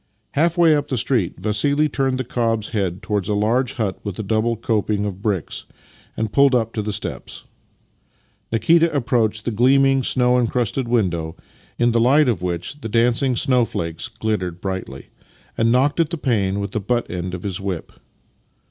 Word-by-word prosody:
Half 165 +4 +1
way 165 -3 +5
up 145 -1 -1
the 130 - -2
street 115 -7 0
Vassili 140 +10 +1
turned 135 -2 -1
the 130 - -2
cob's 115 -3 -1
head 95 -5 -2
towards 105 -3 -2
a 105 - +1
large 120 +5 +1
hut 110 -8 -2
with 100 -3 -5
a 110 - -3
double 110 +3 0
coping 105 -2 0
of 100 -2 -5
bricks, 100 -7 -2 0.5
and 110 -1 -2
pulled 140 -2 +5
up 115 -2 0
at 105 - -1
the 105 - -1
steps. 100 - -6 1.1
Nikita 165 +9 +3
approached 115 -5 0
the 120 - 0
gleaming, 135 +4 +4
snow 125 0 +2
encrusted 120 +1 -1
window, 85 -9 0 0.4
in 120 0 +3
the 115 0 +2
light 140 +5 +4
of 110 -9 0
which 90 - -4
the 115 - -5
dancing 120 +3 +2
snowflakes 105 -11 0
glittered 90 -6 -3
brightly, 95 -8 -5 0.5
and 115 0 +2
knocked 135 +6 +2
at 165 -3 +2
a 170 - -2
pane 100 -8 0
with 100 +1 -4
the 110 - -2
butt 120 +4 -1
end 90 0 -4
of 90 - -8
his 95 -2 -3
whip. 95 -4 -4
115 Hz, 175 wpm, -21 LUFS, 100-130 Hz, 1.1 s, way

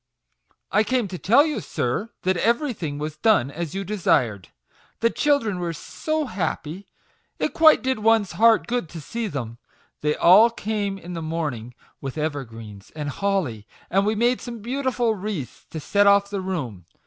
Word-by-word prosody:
" - - -53 0.3
I 210 +2 +4
came 250 +3 +1
up 190 - -9
to 180 - -5
tell 255 +9 +5
you, 305 -2 -2
sir, 140 - -2
that 185 +1 +2
everything 225 - 0
was 150 +1 -5
done 180 - +3
as 170 +2 -5
you 195 - -2
desired, 130 - 0 0.5
The 230 0 +2
children 275 -11 +1
were 170 -1 -2
so 310 - -3
happy, 185 - -4 0.5
it - - -1
quite 315 -3 +6
did 260 -2 0
one's 220 -2 +3
heart 225 0 +4
good 240 -9 -2
to 165 - -8
see 225 +9 -4
them. 120 - -5 0.4
They 150 0 +1
all 205 +7 +7
came 205 -3 -3
in 180 -1 -9
the 165 - -4
morning 150 -8 -4 0.3
with 135 +1 -6
evergreens 115 -9 -5
and 150 -2 -4
holly, 145 - -2 0.2
and 195 +2 +3
we 215 +2 +1
made 240 +3 +2
some 235 -4 -8
beau 260 +5 -3
tiful 245 -4 +1
wreaths 190 - -6
to 160 - -6
set 200 +6 +2
off 200 0 +4
the 200 -2 -2
room. 130 - -4
195 Hz, 180 wpm, -23 LUFS, 150-225 Hz, 0.5 s, all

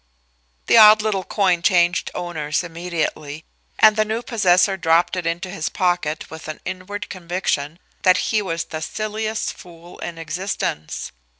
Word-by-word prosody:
The - - +5
odd 215 -1 +8
little 205 -3 0
coin 185 -3 +1
changed 175 -1 +2
owners 160 -3 -2
immediately, 165 -3 -4 0.3
and 215 -1 +6
the 215 - +3
new 220 +2 -3
possessor 195 -5 +3
dropped 170 0 +2
it 180 -2 -3
into 175 +2 -3
his 160 -5 -3
pocket 175 -4 -1
with 160 0 -9
the 155 - -6
inward 205 +3 -5
conviction 170 -4 -3 0.2
that 185 -1 +5 0.2
he 215 - +3
was 165 -4 -2
the 155 -1 -7
silliest 215 +4 -3
fool 175 0 -14
in 170 -1 -6
existence. 165 - -4
180 Hz, 145 wpm, -21 LUFS, 165-205 Hz, 0.3 s, odd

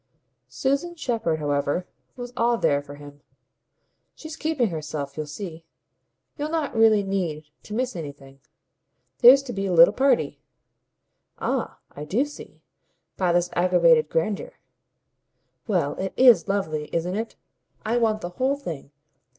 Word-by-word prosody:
Susan 280 +6 -1
Shepherd, 230 - -1
however, 145 +3 -1 0.3
was 245 -1 -8
all 235 0 +2
there 145 -9 +1
for 145 0 -11
him. 145 0 -13 0.9
"She's 315 0 -9
keeping 310 -8 0
herself. 150 -3 -5
You'll 155 -1 -4
see. 165 +1 -8 0.8
You'll 295 +1 -2
not 315 -5 -2
really 220 -2 +5
need 165 -6 -3
to 210 - -8
miss 250 -1 -2
anything. 140 -4 -9 0.8
There's 265 +3 +8
to 250 -3 -6
be 195 0 -2
a 185 - -1
little 170 0 +7
party." 255 - +1 1.0
"Ah - - -2
I 150 - -8
do 220 - +1
see 295 - -13 0.5
by 180 -2 +1
this 175 0 +1
aggravated 170 -3 +4
grandeur." 195 +5 -2 1.1
"Well, 175 -9 0
it 190 0 -4
IS 250 -5 +6
lovely, 155 -7 -2
isn't 175 +3 -2
it? 225 +2 -4 0.5
I 230 +2 +1
want 220 -2 +1
the 175 - -4
whole 260 +10 0
thing. 165 - -7
190 Hz, 140 wpm, -24 LUFS, 155-240 Hz, 1.1 s, There's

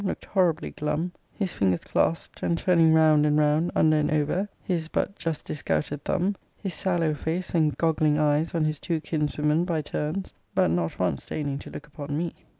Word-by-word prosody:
looked 190 - -3
horribly 175 -5 +1
glum; 150 +4 -2 0.2
his 195 -5 -3
fingers 95 -3 +1
claspt, 165 - -1
and 170 - +1
turning 165 -3 +4
round 155 -2 +5
and 150 0 +3
round, 150 +3 +3
under 155 0 +4
and 150 - +1
over, 155 +7 0
his 170 -4 -1
but 195 - -1
just 165 -5 -3
disgouted 140 - -2
thumb; 190 +3 0 0.2
his 195 -4 -4
sallow 170 -4 +1
face, 165 +4 -3
and 155 -4 +2
goggling 155 -2 +2
eyes, 150 +2 +1
on 160 -2 +2
his 155 -1 -1
two 165 -2 -1
kinswomen, 150 +1 0
by 170 -3 0
turns; 155 +5 -3 0.2
but - - +3
not 85 -1 -1
once 90 -6 -1
deigning 140 -2 -3
to - - -10
look - - -8
upon 145 -1 -5
me. 170 +1 -2
155 Hz, 185 wpm, -26 LUFS, 150-170 Hz, 0.2 s, round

